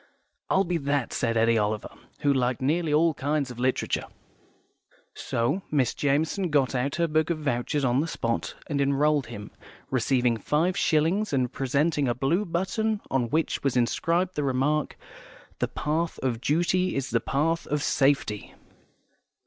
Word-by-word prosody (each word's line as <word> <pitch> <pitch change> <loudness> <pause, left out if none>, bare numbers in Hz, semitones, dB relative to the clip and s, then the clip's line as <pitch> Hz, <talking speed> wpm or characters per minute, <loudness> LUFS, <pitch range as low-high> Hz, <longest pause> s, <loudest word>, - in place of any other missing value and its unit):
"I'll 190 - +3
be 175 -2 -1
that," 140 -3 -1
said 115 -1 0
Eddy 115 0 +3
Oliver, 105 0 -2 0.3
who 145 -1 +3
liked 125 -2 0
nearly 155 +4 0
all 160 +2 +4
kinds 140 -1 -1
of 120 - -9
literature. 130 +1 0 1.1
So 120 +11 -1
Miss 140 -5 +1
Jamison 160 +6 0
got 140 -4 +2
out 130 +2 -1
her 170 -1 +1
book 155 0 +1
of 170 - 0
vouchers 140 0 -1
on 125 +2 +2
the 165 - -2
spot, 115 - -2
and 140 -2 -1
enrolled 140 +1 +2
him, 105 0 -8 0.4
receiving 125 -2 +2
five 160 +10 0
shillings 165 +5 +1
and 125 -3 0
presenting 140 +2 +1
a 120 - 0
blue 160 +11 +1
button 210 +5 -1
on 125 -3 +1
which 160 +5 0
was 135 -2 +1
inscribed 170 +9 +1
the 150 - -2
remark, 140 +3 0 0.6
"The - - +1
Path 160 +3 -2
of 120 -3 -1
Duty 175 +5 +1
is 135 -2 -2
the 115 - +3
Path 160 +7 0
of 150 -1 -1
Safety." 135 -7 +1
145 Hz, 155 wpm, -26 LUFS, 125-160 Hz, 1.1 s, all